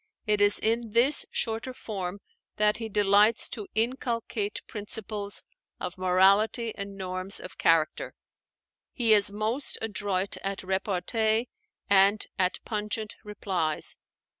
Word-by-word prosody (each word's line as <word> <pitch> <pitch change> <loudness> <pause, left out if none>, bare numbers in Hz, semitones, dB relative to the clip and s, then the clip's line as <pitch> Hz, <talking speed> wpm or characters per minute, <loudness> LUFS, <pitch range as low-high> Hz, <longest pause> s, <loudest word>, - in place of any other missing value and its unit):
It 210 -2 +1
is 205 0 +5
in 225 0 0
this 255 +5 +4
shorter 230 +3 -2
form 195 -4 -5 0.3
that 210 0 +2
he 225 -1 -5
delights 205 +2 +4
to 210 -5 -7
inculcate 230 -3 -1
principles 210 -1 -4 0.4
of 180 - -5
morality 195 +5 +3
and 200 0 -7
norms 185 +1 -5
of 185 - -11
character. 160 -2 +2 0.8
He 230 -4 +3
is 205 -1 +4
most 220 +7 0
adroit 200 -3 -2
at 195 0 -4
repartee 215 +4 0 0.4
and 200 +1 +5
at 185 -1 +2
pungent 210 0 -3
replies. 190 -7 -2
210 Hz, 115 wpm, -27 LUFS, 195-220 Hz, 0.8 s, is